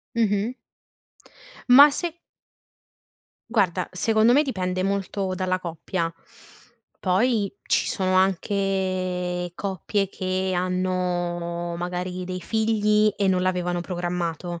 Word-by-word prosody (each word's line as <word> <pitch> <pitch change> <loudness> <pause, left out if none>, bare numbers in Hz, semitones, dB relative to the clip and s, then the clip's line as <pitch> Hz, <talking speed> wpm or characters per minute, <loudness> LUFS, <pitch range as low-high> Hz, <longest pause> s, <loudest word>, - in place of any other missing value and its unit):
Mh-mh. 215 0 +1 1.2
Ma 280 +4 +10
se 340 +3 -3 1.4
Guarda, 185 -5 +1
secondo 220 +5 +3
me, 290 - +5
dipende 185 -9 -2
molto 195 -1 -1
dalla 185 0 -1
coppia. 170 0 -3 0.9
Poi, 205 +2 +1
ci - - +1
sono 185 -1 0
anche 185 -2 0
coppie 195 +1 -2
che 185 0 -2
hanno, 175 -1 -1
magari, 180 +1 -4
dei 185 0 -5
figli 215 0 +2
e 200 - +1
non 185 -1 +2
l'avevano 180 -1 0
programmato 175 -1 -3
185 Hz, 100 wpm, -24 LUFS, 180-200 Hz, 1.4 s, Ma